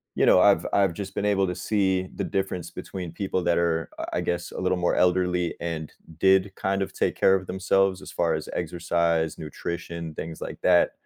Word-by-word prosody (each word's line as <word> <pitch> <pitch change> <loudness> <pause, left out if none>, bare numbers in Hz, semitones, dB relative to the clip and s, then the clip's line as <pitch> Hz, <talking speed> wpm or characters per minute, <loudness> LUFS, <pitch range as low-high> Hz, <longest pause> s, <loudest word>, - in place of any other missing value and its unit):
you - - +3
know, 90 - +6
I've 100 +1 +5
I've 100 -3 +3
just 95 +2 -7
been - - -1
able 100 -2 +2
to 90 - -3
see 95 -3 0
the - - -2
difference 95 -3 -2
between 90 -3 -6
people 95 -1 -2
that 85 0 +2
are, 85 -1 0 0.2
I - - 0
guess, 85 0 -2
a - - -6
little 95 0 +1
more 90 - +1
elderly 90 -1 +2
and 80 -2 -4 0.3
did 95 +1 +4
kind 95 0 -1
of 95 - -2
take - - 0
care 95 - +4
of 95 -1 -3
themselves 95 0 +1
as - - -9
far 85 -1 +1
as 75 - -5
exercise, 85 -1 0
nutrition, 85 +1 -5
things 80 +1 -6
like - - -6
that 90 -1 +5
90 Hz, 200 wpm, -25 LUFS, 85-95 Hz, 0.3 s, know